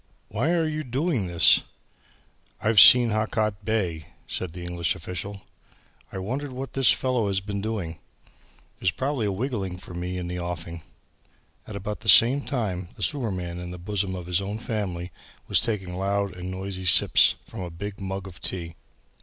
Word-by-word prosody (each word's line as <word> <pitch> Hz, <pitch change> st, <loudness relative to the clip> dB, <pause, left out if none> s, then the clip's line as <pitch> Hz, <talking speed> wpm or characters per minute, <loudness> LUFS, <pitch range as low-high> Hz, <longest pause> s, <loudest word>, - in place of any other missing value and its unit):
"Why 155 Hz, -, 0 dB
are 165 Hz, -2 st, +2 dB
you 155 Hz, 0 st, -3 dB
doing 130 Hz, -, -1 dB
this!" 85 Hz, -2 st, +5 dB, 1.0 s
"I've 110 Hz, -1 st, +4 dB
seen 120 Hz, +1 st, +9 dB
Hakaat 110 Hz, -1 st, -1 dB
Bey," 90 Hz, -9 st, -1 dB, 0.2 s
said 90 Hz, -3 st, -4 dB
the 90 Hz, 0 st, -7 dB
English 85 Hz, -1 st, -1 dB
official. 95 Hz, +4 st, -6 dB, 0.7 s
"I -, -, -6 dB
wonder 130 Hz, +10 st, -3 dB
what 130 Hz, +1 st, -6 dB
this 135 Hz, -2 st, +5 dB
fellow 125 Hz, -5 st, +1 dB
has 95 Hz, -1 st, +1 dB
been 100 Hz, 0 st, -4 dB
doing? 95 Hz, -7 st, -4 dB, 0.3 s
There -, -, -19 dB
is -, -, +6 dB
probably 130 Hz, 0 st, -1 dB
a -, -, 0 dB
wigging 100 Hz, -4 st, -3 dB
for 90 Hz, -1 st, -11 dB
me 90 Hz, +1 st, -4 dB
in 90 Hz, -1 st, -4 dB
the 90 Hz, 0 st, -4 dB
offing." 85 Hz, -1 st, -5 dB, 0.9 s
At 105 Hz, -, -7 dB
about 105 Hz, +1 st, -4 dB
the 110 Hz, 0 st, -3 dB
same 125 Hz, +7 st, +7 dB
time 95 Hz, -11 st, -3 dB
the -, -, -5 dB
sewerman 95 Hz, -, -2 dB
in 90 Hz, 0 st, -6 dB
the 90 Hz, -, -7 dB
bosom 95 Hz, +1 st, -2 dB
of 90 Hz, -2 st, -6 dB
his 90 Hz, +2 st, +1 dB
own 100 Hz, +2 st, -4 dB
family 100 Hz, -7 st, -4 dB, 0.4 s
was -, -, +4 dB
taking 95 Hz, -7 st, -3 dB
loud 100 Hz, +1 st, -1 dB
and 90 Hz, 0 st, -6 dB
noisy 95 Hz, 0 st, -5 dB
sips 90 Hz, -, +6 dB
from -, -, -10 dB
a 90 Hz, -, -4 dB
big 100 Hz, +4 st, -7 dB
mug 95 Hz, 0 st, -4 dB
of 90 Hz, -3 st, -12 dB
tea. 85 Hz, -3 st, -3 dB
100 Hz, 180 wpm, -25 LUFS, 90-110 Hz, 1.0 s, seen